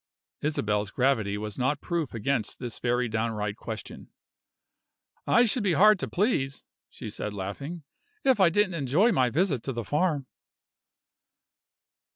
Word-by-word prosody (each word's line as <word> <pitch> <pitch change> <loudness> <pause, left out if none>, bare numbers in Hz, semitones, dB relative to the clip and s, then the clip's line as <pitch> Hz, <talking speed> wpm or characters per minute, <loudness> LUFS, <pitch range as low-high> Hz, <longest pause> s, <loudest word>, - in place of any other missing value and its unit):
Isabel's 105 -9 0
gravity 110 -4 +1
was 105 +1 -5
not 130 +3 +1
proof 165 -7 -3
against 115 +1 -1
this 120 -3 -6
very 125 0 +1
downright 110 -2 -2
question. 110 -2 -8 1.2
"I 240 - +5
should 240 +2 0
be 195 -4 +2
hard 210 +5 +6
to - - -2
please," 160 - 0 0.3
she 120 - -9
said 105 0 -5
laughing, 140 - -5 0.4
"if 265 -5 +3
I 185 -3 +6
didn't 195 +1 +2
enjoy 165 - +2
my 130 - +3
visit 150 - +1
to 135 - -4
the 120 -1 -3
farm." 150 - 0
135 Hz, 140 wpm, -27 LUFS, 110-175 Hz, 1.2 s, hard